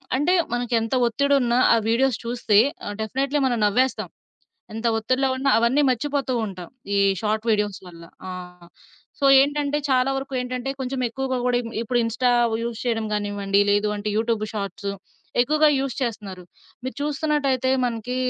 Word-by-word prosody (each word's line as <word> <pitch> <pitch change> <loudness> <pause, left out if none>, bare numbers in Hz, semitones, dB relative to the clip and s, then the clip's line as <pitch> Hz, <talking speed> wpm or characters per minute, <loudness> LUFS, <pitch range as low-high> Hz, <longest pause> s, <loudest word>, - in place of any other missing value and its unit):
అంటే 295 +7 +2 0.2
మనకెంత 240 0 0
ఒత్తిడున్న 270 0 +1 0.2
ఆ - - +5
వీడియోస్ 250 +1 +2
చూస్తే 235 -3 +1 0.3
ఆహ్, 205 - -5
డెఫినెట్‌లీ 270 +6 -1
మనం 245 -2 +1
నవ్వేస్తాం. 250 +6 +1 0.6
ఎంత 225 +2 -3
ఒత్తిడిలో 255 +4 0
ఉన్న 270 +1 -1
అవన్నీ 235 +6 +3
మర్చిపోతూ 275 +1 -1
ఉంటాం. 185 -3 -8 0.3
ఈ - - +3 0.2
షార్ట్ 215 0 -1
వీడియోస్ 210 -2 0
వల్ల. 170 -1 -12 0.3
ఆ! - - -5 0.9
సో, 285 - -3 0.2
ఏంటంటే 290 +1 +1
చాలా 255 +1 +3
వరకు 270 0 -5
ఏంటంటే, 250 +1 -4
కొంచెం 260 0 -3
ఎక్కువగా 260 +2 -3
గూడా 245 -1 +2
ఇమ్ 230 - -8
ఇప్పుడు 240 +1 0
ఇన్‌స్టా 245 +2 +1 0.3
యూజ్ 235 -1 -4
చేయడం 225 -2 -1
గానివ్వండి, 205 -1 0
లేదు 205 +1 +2
అంటే 205 +1 -4
యూట్యూబ్ 225 -1 0
షార్ట్స్ 200 0 -4 0.5
ఎక్కువగా 305 +3 +3
యూజ్ 270 -2 -2
చేస్తున్నారు. 205 -6 -5 0.4
మీరు 260 - -5
చూస్తున్నట్టయితే 285 -3 0 0.2
మనకి 240 +1 -4
245 Hz, 150 wpm, -23 LUFS, 220-270 Hz, 0.9 s, ఆ